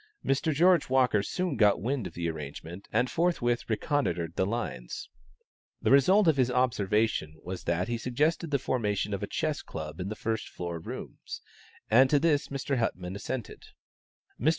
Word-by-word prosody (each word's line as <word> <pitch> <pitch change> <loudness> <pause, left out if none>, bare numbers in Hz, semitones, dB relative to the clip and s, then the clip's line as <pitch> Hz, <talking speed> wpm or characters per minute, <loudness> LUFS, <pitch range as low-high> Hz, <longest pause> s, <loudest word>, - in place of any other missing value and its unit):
Mr. 135 +4 +1
George 170 +1 +4
Walker 125 -5 +3
soon 180 - -2
got 105 -4 +4
wind 120 0 -1
of 85 - -12
the 85 -1 -2
arrangement, 80 +4 -7
and 125 - +2
forthwith 130 -10 +1
reconnoitred 100 - 0
the 95 - +1
lines. 100 - -4 0.7
The - - +1
result 185 +9 +6
of 155 -3 +4
his 130 -2 +3
observations 110 -9 +1
was 90 +1 -6
that 85 +2 0
he 120 -1 -2
suggested 150 +7 0
the 145 - +2
formation 105 -5 -1
of 100 - -2
a - - -2
chess - - -1
club 80 +1 -7
in 90 +2 -3
the 110 - -4
first 110 0 -3
floor 85 -1 -5
rooms, - - -8 0.4
and 130 +4 +6
to 145 - +4
this 150 -1 +2
Mr. 140 -1 -2
Huttmann 90 -5 -2
assented. 115 +3 -5 0.8
Mr. 135 - +3
115 Hz, 170 wpm, -29 LUFS, 95-140 Hz, 0.8 s, result